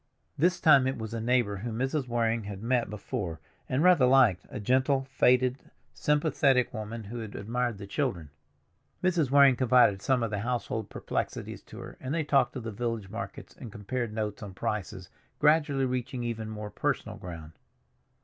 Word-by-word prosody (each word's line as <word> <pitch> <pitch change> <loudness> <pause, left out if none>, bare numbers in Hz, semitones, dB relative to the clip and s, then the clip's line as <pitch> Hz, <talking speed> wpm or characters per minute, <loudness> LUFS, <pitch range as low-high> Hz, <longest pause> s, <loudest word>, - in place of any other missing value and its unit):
This 175 +5 +2
time 140 -4 +6
it 130 - -2
was 110 0 -6
a 115 - -3
neighbor 120 -4 +1
whom 110 +2 -5
Mrs. 135 +2 -1
Waring 115 -2 0
had 100 0 -7
met 120 -2 +1
before 100 -5 -4 0.3
and 130 +5 +1
rather 175 -8 +6
liked, 130 -9 +4
a - - -6
gentle, 130 +5 +2
faded, 125 0 +3 0.3
sympathetic 145 -4 +2
woman 110 +1 -5
who 115 +4 -7
had 110 -3 -7
admired 120 +1 -2
the 100 - -8
children. 100 - -2 0.7
Mrs. 175 -7 +2
Waring 140 -1 +6
confided 120 -6 +4
some 125 +2 +1
of 115 - -2
the 105 - -2
household 110 -2 -3
perplexities - - -4
to - - -12
her, - - -9
and 130 +4 -3
they 165 - 0
talked 135 -4 +2
of 130 - -5
the 115 - -4
village 115 -3 -4
markets 100 -3 -7
and 120 -5 -9
compared 115 +3 -4
notes 105 -1 -3
on 100 -3 -8
prices, 95 -3 -4 0.3
gradually 150 -3 +3
reaching 125 -1 -3
even 115 -2 -4
more 105 -1 -6
personal - - -2
ground. 80 -3 -9
120 Hz, 175 wpm, -28 LUFS, 105-130 Hz, 0.7 s, time